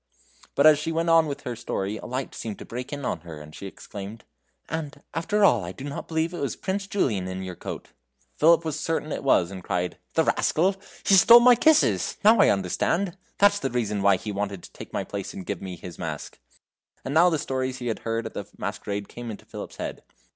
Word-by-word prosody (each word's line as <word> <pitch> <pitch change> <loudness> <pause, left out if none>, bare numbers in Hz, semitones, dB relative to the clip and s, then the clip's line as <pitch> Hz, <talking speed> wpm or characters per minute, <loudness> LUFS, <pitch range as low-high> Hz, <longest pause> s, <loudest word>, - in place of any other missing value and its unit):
But 140 - +4
as 155 -2 +8
she 165 +2 -2
went 165 +1 0
on 165 -1 +6
in 140 - -2
her 125 - -3
story 100 -1 -3
a - - -8
light 130 +2 -4
seemed 110 -3 -5
to - - -9
break 125 +2 -6
in 145 -2 -4
on 85 - -1
her, 80 -2 -9
and 75 +1 -12
she 100 - -7
exclaimed: 100 +3 -9 0.4
"And, 150 -3 -5
after 205 +5 +2
all, 120 - +4
I 90 +1 -6
do 130 - -10
not 140 0 -5
believe 160 +1 -1
it 175 - -5
was 140 - -2
Prince 195 +1 -3
Julian 110 - 0
in 95 0 -4
your 95 -1 -5
coat!" - - -7 0.5
Philip 165 +1 +5
was 155 -3 -2
certain 160 -2 -2
it - - -3
was, 95 -9 +3
and 95 -2 -8
cried: 90 -1 -2 0.2
"The 160 - +4
rascal! 185 +4 +2 0.3
He - - +4
stole 235 +5 +9
my 250 +1 +8
kisses 310 +6 +3
now 220 +1 +7
I - - +6
understand! 165 - 0 0.2
That's 205 0 +5
the 135 - -1
reason 105 -5 -1
why 100 0 +5
he 105 +3 -5
wanted 100 -2 -3
to - - -12
take - - -10
my - - -2
place 100 -1 -6
and 95 - -7
gave 100 -4 -4
me 95 -2 -6
his 85 0 -10
mask!" 80 -4 -5 0.7
And 135 - -3
now 170 +3 +6
the 160 - +1
stories 130 -2 -2
he 125 - -7
had 115 -2 -2
heard 115 0 -2
at - - -6
the - - -6
masquerade 100 0 -4
came 120 -1 -8
into 105 - -8
Philip's - - -8
head. - - -5
130 Hz, 230 wpm, -25 LUFS, 100-165 Hz, 0.7 s, stole